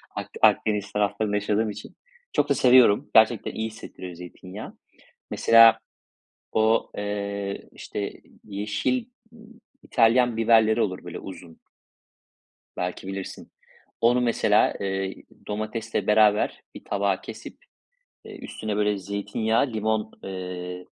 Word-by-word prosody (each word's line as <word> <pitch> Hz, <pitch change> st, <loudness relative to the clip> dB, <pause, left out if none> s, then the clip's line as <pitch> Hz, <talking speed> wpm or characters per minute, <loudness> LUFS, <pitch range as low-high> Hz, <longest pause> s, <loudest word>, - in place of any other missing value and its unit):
Ak -, -, -5 dB
Akdeniz 105 Hz, -2 st, +2 dB
taraflarında 105 Hz, 0 st, 0 dB
yaşadığım 105 Hz, +1 st, 0 dB
için 105 Hz, +1 st, -9 dB, 0.4 s
çok -, -, +1 dB
da -, -, +3 dB
seviyorum. 125 Hz, -5 st, +5 dB
Gerçekten 110 Hz, 0 st, +4 dB
iyi 110 Hz, 0 st, -3 dB
hissettiriyor 95 Hz, -4 st, -9 dB
zeytinyağı. 90 Hz, +3 st, -10 dB, 0.5 s
Mesela 115 Hz, -1 st, +6 dB, 0.7 s
o, 110 Hz, +1 st, +2 dB
eee, 100 Hz, -1 st, -4 dB
işte, 100 Hz, -1 st, -5 dB, 0.3 s
yeşil, 105 Hz, -, -2 dB, 0.3 s
ııı, 225 Hz, -1 st, -16 dB, 0.4 s
İtalyan 120 Hz, +1 st, +3 dB
biberleri 115 Hz, 0 st, +4 dB
olur, 95 Hz, -4 st, -2 dB
böyle 90 Hz, 0 st, -7 dB
uzun 90 Hz, -3 st, -11 dB, 1.2 s
belki 90 Hz, +1 st, -4 dB
bilirsin. 95 Hz, -1 st, -7 dB, 0.5 s
Onu 120 Hz, +2 st, +4 dB
mesela, 120 Hz, -1 st, +3 dB
eee, 95 Hz, -1 st, -2 dB, 0.3 s
domatesle 110 Hz, +2 st, -3 dB
beraber 105 Hz, 0 st, +3 dB
bir -, -, -10 dB
tabağa 100 Hz, -2 st, 0 dB
kesip, -, -, -10 dB, 0.7 s
eee, 425 Hz, -2 st, -10 dB
üstüne, 110 Hz, -1 st, -5 dB
böyle, 105 Hz, -1 st, +1 dB
zeytinyağı, 105 Hz, +5 st, -1 dB
limon, 110 Hz, 0 st, -1 dB
eee, 90 Hz, -1 st, -6 dB
105 Hz, 110 wpm, -25 LUFS, 100-110 Hz, 1.2 s, Mesela